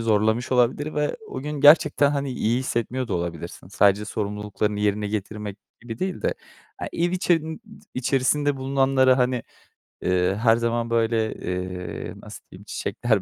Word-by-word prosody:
zorlamış 110 +3 +1
olabilir 130 +5 +2
ve 150 0 0
o 130 - -5
gün 150 0 -4
gerçekten 145 -1 +6
hani 140 -2 -1
iyi 120 0 +1
hissetmiyor 125 0 -2
da 95 - -1
olabilirsin. 85 0 -5
Sadece 100 +1 +3
sorumluluklarını 105 0 -2
yerine 105 0 0
getirmek 105 -1 -4 0.2
gibi 115 -1 -7
değil 185 -1 -3
de, - - +1 0.4
he, - - -4
ev 175 +1 +1
içerin 165 -2 0 0.3
içerisinde 135 +3 +1
bulunanlara, 135 -1 +3
hani, 125 -1 +1 0.6
eee, 90 +1 +2
her 115 -1 +5
zaman, 115 0 -1
böyle, 115 -1 +1
eee, 90 0 -5
nasıl - - -11
diyeyim, - - -13
çiçekler 120 -2 -1
115 Hz, 145 wpm, -24 LUFS, 105-135 Hz, 0.6 s, gerçekten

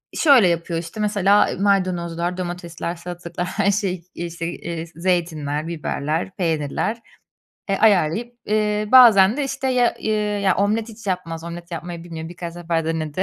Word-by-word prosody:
şöyle 270 - +6
yapıyor 170 0 -1
işte 165 +5 -8
mesela 205 -1 +3
maydanozlar, 180 -3 0
domatesler, 175 -1 -5
salatalıklar 175 0 -6
her 200 +1 +1
şey 190 -4 -2
işte, 170 -1 -4
eee, 165 -1 -5
zeytinler, 165 -4 -1
biberler, 165 +1 -3
peynirler, 165 +5 -1 0.7
eee, 195 - +1
ayarlayıp, 215 +3 +2
eee, 210 0 0
bazen 225 -4 +8
de 290 - 0
işte, 270 0 -2
ya, 250 -2 +2
ııı, 210 -1 0
ya, 195 -2 +3
omlet 215 +3 +1
hiç 225 -1 -12
yapmaz 165 -3 -3
omlet 170 +1 -8
yapmayı 170 0 -6
bilmiyor. 160 -2 -7
Birkaç 170 0 -7
defa 165 -1 -1
denedi. 160 +1 -2
180 Hz, 145 wpm, -21 LUFS, 170-205 Hz, 0.7 s, bazen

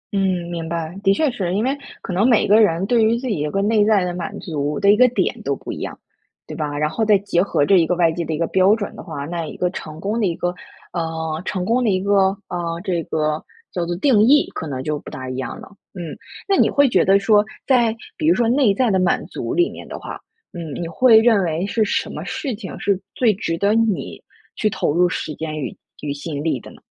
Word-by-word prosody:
嗯， 190 -3 0
明 165 -1 -4
白， 165 0 -4
的 195 - +4
确 290 +7 +2
是。 190 -8 -3
因 210 - +1
为 265 +3 +1 0.3
可 185 - -5
能 205 +8 +3
每 230 - +4
个 215 +2 +6
人 180 -2 +2
对 235 +1 +3
于 225 +2 +3
自 260 +2 -5
己 210 -10 -1
有 150 0 -1
一 - - -7
个 195 0 0
内 210 0 +3
在 205 -3 +3
的 180 - -3
满 175 -1 -5
足 150 -3 -3
的 200 0 +5
一 - - +5
个 250 +4 +6
点 250 - -1
都 - - -1
不 - - -7
一 - - -7
样， - - -6 0.5
对 - - -8
吧？ 145 -2 -3
然 150 +1 +1
后 220 +8 -2
再 210 -2 +5
结 195 -3 0
合 180 -6 +1
这 195 - +5
一 165 -2 +3
个 180 - +1
外 170 -2 +3
界 170 +1 -3
的 160 - -5
一 155 - -1
个 170 - 0
标 190 +4 +4
准 205 -3 -5
的 - - -8
话， 145 -5 -6
那 170 +2 -3
一 - - -8
个 180 0 0
成 155 -3 -8
功 210 +5 -2
的 210 - +2
一 170 - -2
个 175 0 -2 0.4
呃 160 -2 -3
成 185 -2 -2
功 240 +5 +2
的 230 - +2
一 185 -2 +2
个， 195 0 +3 0.2
啊， 170 -1 -3
这 175 -4 -1
个 155 0 -1 0.3
叫 175 - -2
做 175 - -2
定 215 +2 +3
义 280 +7 +5
可 160 - -5
能 130 -3 -4
就 150 0 -2
不 - - -11
大 130 0 -7
一 130 0 -4
样 130 - -5
了， - - -11 0.3
嗯。 175 -4 -6 0.3
那 395 - +3
你 - - +4
会 285 -1 +4
觉 - - +3
得 195 +1 +5
说， 205 +1 +4 0.2
在 240 -4 +3 0.2
比 310 - -2
如 335 - +5
说 235 -2 +2
内 245 -3 +3
在 235 +3 +1
的 190 - +2
满 185 0 +1
足 - - -5
里 350 0 +3
面 - - -10
的 - - -6
话， - - -8 0.3
嗯， 165 -5 -6
你 170 - -3
会 230 +7 +5
认 225 -3 +4
为 165 +1 -1
是 215 +2 +1
什 205 - -1
么 - - -6
事 270 -5 -3
情， 205 -3 -8
是 200 -2 +1 0.2
最 230 -4 +3
值 165 -3 -3
得 200 +4 +2
你 225 -3 0 0.3
去 215 - +1
投 145 - -1
入 175 +2 +3
时 155 - -4
间 155 0 -5
与 130 - -5 0.3
与 145 -1 -3
心 145 0 -5
力 155 -6 0
的 - - -12
呢？ - - -15
185 Hz, 285 characters per minute, -20 LUFS, 165-215 Hz, 0.5 s, 个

